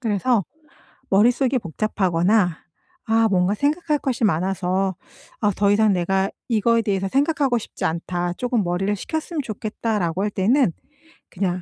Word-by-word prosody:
그래서 225 -1 +1 0.7
머릿속이 245 +6 +3
복잡하거나 185 -1 +1 0.5
'아 225 0 +3
뭔가 185 0 +2
생각할 300 +5 0
것이 255 -4 -2
많아서 190 0 0 0.5
아 210 -2 +3
더 200 0 +2
이상 210 0 +4
내가 190 +2 0 0.2
이거에 230 0 +2
대해서 195 -2 -1
생각하고 275 - +1
싶지 225 - -5
않다. 175 +2 -2
조금 245 +1 -1
머리를 185 +3 -1
식혔으면 315 - -4
좋겠다.'라고 210 -4 -2
할 210 - 0
때는 230 +4 +2 0.6
그냥 185 -1 -2
205 Hz, 320 characters per minute, -22 LUFS, 185-235 Hz, 0.7 s, 이상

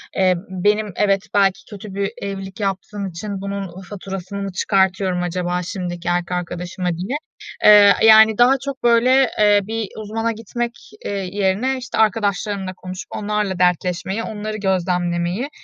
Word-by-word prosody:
Eee, 185 -1 +3
benim 205 +3 0
evet 195 -2 +2
belki 195 0 +3
kötü 205 -1 -9
bir 200 0 -2
evlilik 195 0 -6
yaptığım 200 0 -3
için 195 +3 -6
bunun 195 -2 -5
faturasını 195 0 -6
çıkartıyorum 190 -1 +1
acaba 180 0 -2
şimdiki 175 -1 -5
erkek 175 0 0
arkadaşıma 180 +1 -4
diye. 185 - -3 0.5
Eee, 205 -1 +8
yani, 220 -1 +7
daha 245 +2 +6
çok 275 -3 -5
böyle, 245 +2 +4
eee, 205 -1 +5
bir 220 +1 -3
uzmana 225 +2 -2
gitmek, 235 +2 -4 0.3
eee, - - -2
yerine, 200 +6 -1
işte, 245 -2 -6
arkadaşlarımla 205 -2 0
konuşup 185 0 -8
onlarla 210 -3 -2
dertleşmeyi, 180 +4 0
onları 215 0 -5
gözlemlemeyi, 180 +3 -1
195 Hz, 135 wpm, -20 LUFS, 185-215 Hz, 0.5 s, Eee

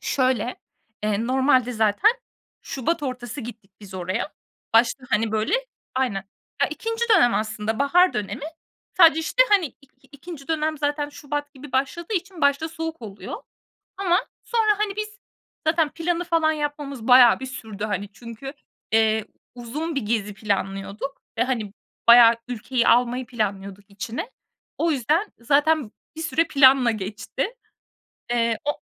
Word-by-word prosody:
Şöyle, 255 -3 0 0.5
eee, 215 +1 0
normalde 255 -1 +3
zaten 220 - +3 0.5
şubat 295 +5 -2
ortası 255 -1 -5
gittik 225 -5 -10
biz 195 -2 -11
oraya. 185 - -3 0.4
Başta, 240 +3 +3
hani, 220 0 +1
böyle 220 - +1 0.4
Aynen. 215 -7 0 0.4
Ya, - - +3
2'nci 455 +1 -2
dönem 245 -9 +4
aslında, 220 0 -2
bahar 355 +6 +4
dönemi. 210 +6 -4 0.5
Sadece, 325 -3 +7
işte, - - +3
hani, 395 -5 +4
i 265 - -14 0.4
ikinci 285 0 -10
dönem 310 -1 -1
zaten 290 0 -1
şubat 290 0 -5
gibi 275 0 -12
başladığı 330 +9 -1
için 365 -1 -4
başta 280 +2 +2
soğuk 325 -3 -6
oluyor. 205 -2 -7 0.6
Ama 370 -1 +2 0.2
sonra, 430 -3 +2
hani, 410 -2 -1
biz 425 -1 -5 0.5
zaten 315 -1 +3
planı 340 +3 -2
falan 330 -2 +2
yapmamız 290 -5 -4
bayağı 250 -2 +7
bir 265 - -5
sürdü, 220 -6 -7
hani, 205 -1 -3
çünkü, 235 +5 -9 0.4
eee, 220 -1 +3 0.3
uzun 285 +7 -4
bir 275 - 0
gezi 210 -1 -1
planlıyorduk. 200 +5 -3 0.2
Ve, - - +3
hani, 230 -6 -3 0.3
bayağı 235 0 +9
ülkeyi 245 +1 -1
almayı 245 +1 +3
planlıyorduk 200 -3 -4
içine. 225 - -5 0.5
O 335 - +1
yüzden 305 - 0
zaten 285 0 +2 0.2
bir 320 - -6
süre 330 0 +1
planla 265 -4 +6
geçti. 220 - -4 0.8
Eee, 230 -2 +1
o 295 - -2
260 Hz, 140 wpm, -23 LUFS, 220-315 Hz, 0.8 s, bayağı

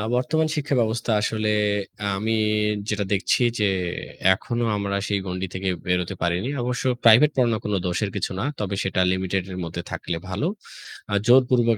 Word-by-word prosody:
বর্তমান 155 +5 +1
শিক্ষা 145 -2 -1
ব্যবস্থা 115 0 0
আসলে 110 0 0 0.7
আমি 110 +3 -1 0.6
যেটা 105 -1 -1
দেখছি 100 +5 +1 0.2
যে, 105 - +3 0.7
এখনো 120 +5 -3
আমরা 100 -1 -2
সেই 100 -1 0
গণ্ডি 90 +1 -3
থেকে 95 0 -2 0.2
বেরোতে 90 +1 0
পারিনি। 90 +8 0
অবশ্য 125 +1 -2 0.2
প্রাইভেট 120 +6 +7
পড়ানোর 120 -4 +2
কোন 105 - -1
দোষের 100 +4 -1
কিছু - - -2
না। - - -1 0.2
তবে 100 -2 -2
সেটা 95 0 -1
লিমিটেড 95 0 -1
এর 90 - -6
মধ্যে 85 +1 -5
থাকলে 85 - -3
ভালো। 100 - -1 0.6
আ - - -1
জোরপূর্বক 120 -2 +5
105 Hz, 160 wpm, -24 LUFS, 95-120 Hz, 0.7 s, প্রাইভেট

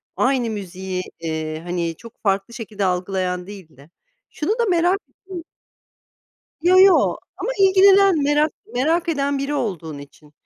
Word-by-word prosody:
aynı 255 -3 +1
müziği, 190 -3 -5 0.2
eee, 160 -1 -4
hani, 170 -1 -3
çok 230 -1 -15
farklı 195 +2 0
şekilde 215 -4 -4
algılayan 180 0 -2
değil 190 -8 -12
de 140 +4 -17 0.4
şunu 305 - -3
da 470 - +3
merak 355 +2 +2
ettim. 370 -4 -10 1.2
Yo, 360 +2 +5
yo, 385 -1 +5 0.2
ama - - -3
ilgilenen, 390 -3 +5
merak 295 +1 +2 0.2
merak 330 +7 +1
eden 280 -3 0
biri 275 +2 -2
olduğun 170 - -4
için. 145 +1 -15
225 Hz, 140 wpm, -21 LUFS, -, 1.2 s, Yo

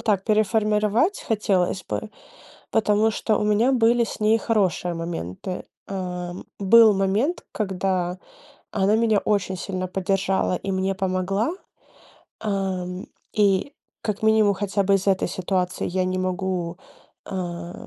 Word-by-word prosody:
так. 210 -4 +1
Переформировать 215 - +2
хотелось 195 -4 0
бы, - - -3 0.6
потому 215 0 +3
что 215 0 0
у - - 0
меня 210 +5 +3
были 235 -1 +4
с 225 - -7
ней 215 +1 +4
хорошие 195 -6 0
моменты. 165 - -5 0.2
Э, 180 -2 -4 0.3
был 220 +2 +7
момент, 200 - 0
когда 185 -3 -1 0.5
она 200 +1 +2
меня 220 -2 +3
очень 195 -3 0
сильно 185 0 -3
поддержала 195 0 0
и 195 - -4
мне 190 +1 0
помогла. 190 - 0 0.9
Ам, 190 -3 -3 0.3
и 205 +6 +2 0.3
как 210 -1 -3
минимум 220 -2 +4
хотя 200 0 -1
бы 200 - +3
из-за 195 0 +2
этой 190 -2 +1
ситуации 185 0 -1
я 185 +1 0
не 185 0 -1
могу, 185 -2 -2 0.5
а, 175 -2 -6
195 Hz, 130 wpm, -24 LUFS, 185-215 Hz, 0.9 s, был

